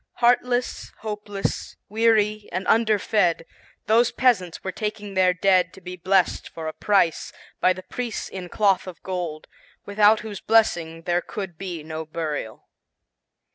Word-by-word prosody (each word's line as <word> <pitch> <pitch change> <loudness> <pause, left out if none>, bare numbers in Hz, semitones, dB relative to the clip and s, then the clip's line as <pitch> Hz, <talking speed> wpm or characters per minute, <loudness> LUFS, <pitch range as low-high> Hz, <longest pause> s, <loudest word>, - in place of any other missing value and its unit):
Heartless, 245 +1 +1
hopeless, 210 -2 -4
weary 215 -1 +2
and 185 +2 -3
underfed, 210 -6 +2 0.4
those 230 +2 +4
peasants 210 -9 +1
were 190 - -3
taking 210 0 -4
their 185 -1 +4
dead 180 -1 +2
to - - -13
be 180 0 -7
blessed 185 +1 +1
for 160 -1 -7
a 155 - -3
price, 195 -4 +1 0.3
by 185 - +4
the 185 +1 -10
priest 240 0 -5
in 185 -2 -7
cloth 195 -2 +2
of 180 - -10
gold, 175 -5 -4 0.4
without 210 +1 +4
whose 210 -3 -7
blessing 170 -7 +2
there 175 +1 +1
could 190 -1 -6
be 175 -3 -6
no 160 0 -5
burial. 155 -8 -5
195 Hz, 140 wpm, -24 LUFS, 175-215 Hz, 0.4 s, those